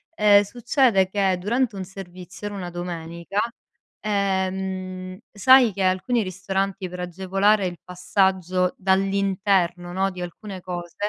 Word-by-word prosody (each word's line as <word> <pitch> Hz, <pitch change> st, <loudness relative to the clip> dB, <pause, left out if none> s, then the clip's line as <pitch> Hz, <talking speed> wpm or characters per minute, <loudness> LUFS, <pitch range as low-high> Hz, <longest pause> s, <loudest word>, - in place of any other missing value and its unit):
ehm, 205 Hz, -1 st, +6 dB
succede 235 Hz, -2 st, +2 dB
che 195 Hz, -2 st, +1 dB
durante 225 Hz, +3 st, 0 dB
un 190 Hz, -, -4 dB
servizio, 185 Hz, 0 st, -9 dB
era 205 Hz, -, -6 dB
una 180 Hz, -2 st, -5 dB
domenica, 170 Hz, +1 st, -5 dB, 0.6 s
ehm, 190 Hz, -2 st, -2 dB
sai 245 Hz, +3 st, +6 dB
che 195 Hz, 0 st, -5 dB
alcuni 190 Hz, +6 st, +1 dB
ristoranti 190 Hz, 0 st, -3 dB
per 180 Hz, 0 st, -7 dB
agevolare 190 Hz, +3 st, +1 dB
il 175 Hz, -2 st, -7 dB
passaggio 180 Hz, 0 st, 0 dB
dall'interno, 190 Hz, -2 st, +1 dB
no, 190 Hz, +1 st, +1 dB
di 180 Hz, -1 st, -8 dB
alcune 190 Hz, +3 st, -7 dB
cose, 175 Hz, -1 st, -6 dB
190 Hz, 125 wpm, -23 LUFS, 180-200 Hz, 0.6 s, ehm